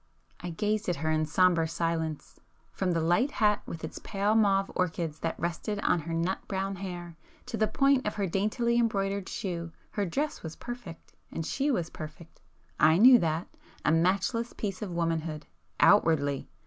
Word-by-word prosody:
I 175 Hz, -, -5 dB
gazed 210 Hz, +4 st, -1 dB
at 175 Hz, -, +1 dB
her 155 Hz, +1 st, -1 dB
in 155 Hz, 0 st, +1 dB
sombre 170 Hz, +1 st, +3 dB
silence. 160 Hz, -2 st, -3 dB, 0.3 s
From 185 Hz, -2 st, -1 dB
the 165 Hz, -, +1 dB
light 175 Hz, -, +2 dB
hat 210 Hz, -6 st, +2 dB
with 165 Hz, -, -7 dB
its 160 Hz, -, -6 dB
pale 205 Hz, +1 st, 0 dB
mauve 195 Hz, -3 st, +3 dB
orchids 165 Hz, -3 st, -2 dB
that 165 Hz, -, -3 dB
rested 175 Hz, +5 st, -2 dB
on 175 Hz, -, +2 dB
her 165 Hz, +1 st, -5 dB
nut 170 Hz, +3 st, 0 dB
brown 195 Hz, 0 st, -2 dB
hair, 175 Hz, -3 st, -7 dB, 0.3 s
to 250 Hz, -2 st, -5 dB
the 220 Hz, -1 st, +2 dB
point 275 Hz, -2 st, +2 dB
of 210 Hz, -, -2 dB
her 205 Hz, -2 st, 0 dB
daintily 215 Hz, +6 st, +1 dB
embroidered 200 Hz, -4 st, 0 dB
shoe, 170 Hz, -3 st, -4 dB, 0.2 s
her 205 Hz, -2 st, -1 dB
dress 290 Hz, -, -2 dB
was 160 Hz, -1 st, -7 dB
perfect,—and 185 Hz, -8 st, -8 dB
she 280 Hz, -, 0 dB
was 175 Hz, -, -1 dB
perfect. 155 Hz, +1 st, -10 dB, 0.4 s
I 160 Hz, +2 st, +6 dB
knew 245 Hz, +4 st, +8 dB
that,—a 160 Hz, -2 st, -3 dB
matchless 195 Hz, +8 st, +1 dB
piece 195 Hz, -3 st, -4 dB
of 210 Hz, -, -3 dB
womanhood... 165 Hz, -2 st, -2 dB, 0.3 s
outwardly! 150 Hz, -8 st, +3 dB
180 Hz, 165 wpm, -29 LUFS, 165-210 Hz, 0.4 s, knew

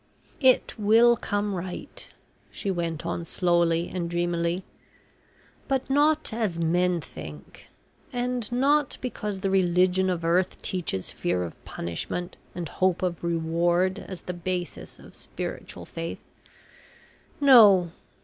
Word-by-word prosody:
"It 260 Hz, -2 st, +4 dB
will 225 Hz, +3 st, +6 dB
come 205 Hz, -2 st, -2 dB
right," 180 Hz, 0 st, -6 dB, 0.4 s
she 200 Hz, -, -3 dB
went 170 Hz, -3 st, -3 dB
on 170 Hz, -, -2 dB
slowly 170 Hz, -1 st, +1 dB
and 175 Hz, -2 st, -3 dB
dreamily, 175 Hz, +1 st, -1 dB, 1.0 s
"but 270 Hz, -1 st, 0 dB
not 300 Hz, -1 st, +2 dB
as 215 Hz, -7 st, -1 dB
men 175 Hz, +2 st, +2 dB
think, 75 Hz, -, -11 dB, 0.4 s
and 245 Hz, -2 st, -2 dB
not 275 Hz, +3 st, +2 dB
because 210 Hz, -6 st, -4 dB
the 195 Hz, -1 st, 0 dB
religion 185 Hz, 0 st, +3 dB
of 170 Hz, -2 st, -2 dB
earth 180 Hz, +2 st, +1 dB
teaches 165 Hz, -, -3 dB
fear 90 Hz, +1 st, -1 dB
of 85 Hz, -, -8 dB
punishment 130 Hz, -, -5 dB, 0.2 s
and 175 Hz, -2 st, -4 dB
hope 185 Hz, +3 st, 0 dB
of 175 Hz, -2 st, -2 dB
reward 170 Hz, +3 st, +1 dB
as 185 Hz, -2 st, -7 dB
the 180 Hz, -, -4 dB
basis 175 Hz, -1 st, -5 dB
of -, -, -15 dB
spiritual -, -, -7 dB
faith. 165 Hz, 0 st, -6 dB, 1.2 s
No. 210 Hz, -, +7 dB
180 Hz, 120 wpm, -26 LUFS, 170-210 Hz, 1.2 s, No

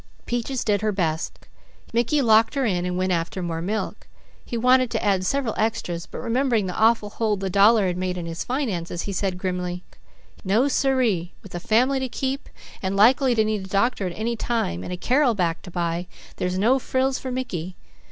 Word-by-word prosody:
Peaches 245 Hz, +2 st, -2 dB
did 205 Hz, -2 st, +1 dB
her 215 Hz, 0 st, +1 dB
best. 165 Hz, -5 st, -2 dB, 0.5 s
Mickey 240 Hz, +5 st, +2 dB
locked 225 Hz, +2 st, +4 dB
her 275 Hz, -2 st, +1 dB
in 180 Hz, -4 st, 0 dB
and 180 Hz, 0 st, -2 dB
went 185 Hz, 0 st, 0 dB
after 175 Hz, +2 st, -1 dB
more 165 Hz, -1 st, -3 dB
milk. 210 Hz, +5 st, -3 dB, 0.4 s
He 235 Hz, -, -4 dB
wanted 250 Hz, +1 st, +4 dB
to -, -, -2 dB
add 190 Hz, -2 st, +2 dB
several 275 Hz, -5 st, 0 dB
extras, 180 Hz, -6 st, -1 dB
but -, -, -7 dB
remembering 235 Hz, -3 st, +1 dB
the 180 Hz, -, -4 dB
awful 220 Hz, -2 st, +3 dB
hole 215 Hz, -2 st, 0 dB
the 190 Hz, -1 st, -3 dB
dollar 205 Hz, +2 st, +5 dB
had 180 Hz, -1 st, -1 dB
made 180 Hz, 0 st, -2 dB
in 175 Hz, -, -4 dB
his 165 Hz, 0 st, -4 dB
finances, 195 Hz, -, -2 dB
he 200 Hz, -, -4 dB
said 190 Hz, -1 st, -1 dB
grimly: 180 Hz, -1 st, -3 dB, 0.6 s
"No 220 Hz, +7 st, +3 dB
sir 270 Hz, -1 st, +2 dB
ee! 180 Hz, -6 st, 0 dB
With 195 Hz, -, -12 dB
a 175 Hz, -, -3 dB
family 250 Hz, +8 st, +2 dB
to 260 Hz, -1 st, -3 dB
keep, 270 Hz, +3 st, -3 dB, 0.3 s
and 190 Hz, 0 st, -1 dB
likely 250 Hz, +5 st, +5 dB
to 220 Hz, -1 st, +3 dB
need 215 Hz, -2 st, -1 dB
a 190 Hz, -, -10 dB
doctor 200 Hz, 0 st, +1 dB
at 175 Hz, -, -6 dB
any 230 Hz, +2 st, -1 dB
time 215 Hz, -, -2 dB
and -, -, -6 dB
a 180 Hz, -, -3 dB
Carrel 250 Hz, +4 st, +2 dB
back 170 Hz, -4 st, 0 dB
to 185 Hz, -, -10 dB
buy, 175 Hz, 0 st, -2 dB, 0.3 s
there's 180 Hz, 0 st, -1 dB
no 240 Hz, +7 st, +3 dB
frills 260 Hz, +1 st, 0 dB
for 260 Hz, -, -5 dB
Mickey. 185 Hz, -9 st, -4 dB
205 Hz, 205 wpm, -24 LUFS, 180-240 Hz, 0.6 s, dollar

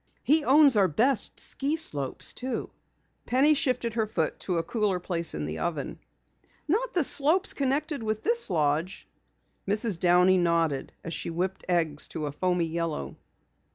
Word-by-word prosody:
He 305 Hz, +2 st, +4 dB
owns 280 Hz, -1 st, +5 dB
our 200 Hz, -2 st, +4 dB
best 230 Hz, -, +2 dB
ski 280 Hz, +3 st, -1 dB
slopes, 145 Hz, -, -2 dB
too." 255 Hz, -2 st, -5 dB, 0.6 s
Penny 275 Hz, +5 st, +4 dB
shifted 250 Hz, -5 st, 0 dB
her 220 Hz, -1 st, -1 dB
foot 165 Hz, -7 st, -2 dB
to 180 Hz, -3 st, -2 dB
a 165 Hz, -, 0 dB
cooler 205 Hz, -1 st, -1 dB
place 170 Hz, -2 st, -1 dB
in 75 Hz, -1 st, -4 dB
the 75 Hz, +1 st, -5 dB
oven. 155 Hz, -5 st, -4 dB, 0.7 s
"Not 445 Hz, +10 st, -1 dB
the 350 Hz, -, +2 dB
slopes 310 Hz, +8 st, +2 dB
connected 280 Hz, +1 st, -2 dB
with 215 Hz, -1 st, -3 dB
this 470 Hz, -, +2 dB
lodge?" 155 Hz, +1 st, -1 dB, 0.6 s
Mrs. 205 Hz, -2 st, 0 dB
Downey 180 Hz, +1 st, +4 dB
nodded 165 Hz, -5 st, 0 dB
as 165 Hz, -, -6 dB
she 155 Hz, -, -4 dB
whipped 180 Hz, +3 st, -3 dB
eggs 160 Hz, -4 st, +1 dB
to 155 Hz, -, -5 dB
a 145 Hz, -, -4 dB
foamy 180 Hz, +3 st, -1 dB
yellow. 165 Hz, -1 st, -4 dB
190 Hz, 155 wpm, -27 LUFS, 165-270 Hz, 0.7 s, owns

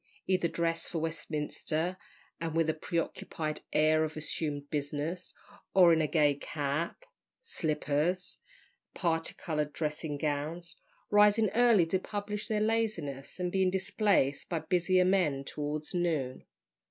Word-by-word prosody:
either 185 Hz, -2 st, +2 dB
dressed 165 Hz, 0 st, -1 dB
for 170 Hz, -, -3 dB
Westminster, 160 Hz, +1 st, -2 dB, 0.4 s
and 165 Hz, -1 st, -3 dB
with 165 Hz, 0 st, +3 dB
the 160 Hz, -, +1 dB
preoccupied 155 Hz, -1 st, -3 dB
air 155 Hz, +1 st, +4 dB
of 155 Hz, 0 st, -4 dB
assumed 150 Hz, -2 st, -3 dB
business, 150 Hz, +4 st, -3 dB, 0.4 s
or 180 Hz, -3 st, +8 dB
in 160 Hz, -1 st, +3 dB
gay 150 Hz, -3 st, +4 dB
cap, 145 Hz, -, -3 dB, 0.4 s
slippers, 160 Hz, -, -1 dB, 0.6 s
and -, -, -10 dB
particoloured 165 Hz, -3 st, -1 dB
dressing 150 Hz, -1 st, -3 dB
gowns, 155 Hz, +4 st, -3 dB, 0.4 s
rising 210 Hz, 0 st, +5 dB
early 235 Hz, -6 st, +5 dB
to 185 Hz, +3 st, 0 dB
publish 205 Hz, +1 st, -4 dB
their 215 Hz, -2 st, 0 dB
laziness, 210 Hz, -12 st, -1 dB
and 180 Hz, -1 st, -1 dB
being 190 Hz, -1 st, +3 dB
displaced 190 Hz, -6 st, +1 dB
by 170 Hz, -, 0 dB
busier 180 Hz, +3 st, +2 dB
men 175 Hz, -8 st, +2 dB
towards 150 Hz, +2 st, -4 dB
noon. 160 Hz, -8 st, -1 dB
165 Hz, 125 wpm, -31 LUFS, 150-185 Hz, 0.6 s, or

